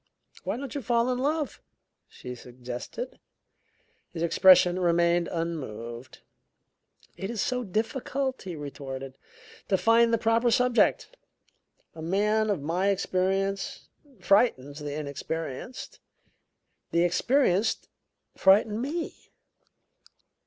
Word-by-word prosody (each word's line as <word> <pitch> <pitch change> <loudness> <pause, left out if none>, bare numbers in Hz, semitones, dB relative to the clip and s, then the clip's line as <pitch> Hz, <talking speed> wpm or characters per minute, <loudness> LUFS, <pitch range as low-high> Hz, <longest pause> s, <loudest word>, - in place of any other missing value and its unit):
"Why - - -1
don't 270 -2 -6
you 285 - -3
fall 240 0 +1
in 250 - -1
love?" 295 +2 -1 0.5
she 125 - -9
suggested. 125 - -7 0.9
His 165 -2 -4
expression 180 +1 +6
remained 170 -1 +2
unmoved. 130 -7 -5 1.0
"It 195 - -4
is 235 -2 -4
so 250 +1 0
difficult," 255 +5 -2
he 180 -3 -6
retorted, 135 -2 -7 0.5
"to 190 - +2
find 230 +4 +4
the 230 - +3
proper 230 +2 +2
subject. 250 - +2 0.8
A 160 - -9
man 210 +5 +1
of 185 -9 -1
my 175 +6 0
experience 195 0 -1 0.3
frightens 150 - +2
the 145 -1 -5
inexperienced: 155 - -5 0.9
the 170 +1 +2
experienced 210 +3 +2 0.5
frighten 210 +3 +4
me." 315 +6 -5
190 Hz, 105 wpm, -27 LUFS, 160-235 Hz, 1.0 s, expression